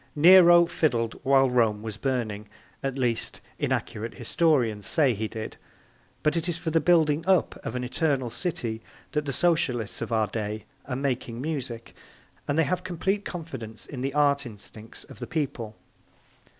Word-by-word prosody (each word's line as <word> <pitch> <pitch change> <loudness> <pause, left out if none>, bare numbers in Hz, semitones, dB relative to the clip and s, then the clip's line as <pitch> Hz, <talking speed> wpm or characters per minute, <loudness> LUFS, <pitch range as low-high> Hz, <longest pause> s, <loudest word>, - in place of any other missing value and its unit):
Nero 175 +2 +8
fiddled 120 -9 0
while 135 0 +5
Rome 115 -4 +2
was 110 -2 -5
burning 110 -5 -2 0.3
at 135 -1 -3
least, 120 -3 -1 0.2
inaccurate 110 +2 -2
historians 125 - +1
say 145 -6 +3
he 110 +1 -3
did; 110 0 -7 0.7
but 150 +1 +2
it 170 +1 -1
is 170 - -1
for 165 -1 -3
the 165 0 +3
building 160 -2 +3
up 190 -3 +2
of - - -4
an 125 - -2
eternal 130 -2 0
city 120 -5 -3 0.3
that 150 -1 -1
the - - 0
Socialists 130 -9 +1
of - - -4
our 110 -1 +2
day 105 0 -4 0.2
are 130 - -2
making 125 -3 -2
music, 130 -6 -4 0.5
and 145 - 0
they 160 - +5
have 180 +5 -1
complete 190 +3 -1
confidence 120 - -7
in 130 -4 -7
the 135 +2 -2
art 145 -1 +3
instincts 110 -1 -10
of - - -14
the - - -5
people. 125 -8 -3
135 Hz, 165 wpm, -26 LUFS, 115-160 Hz, 0.7 s, Nero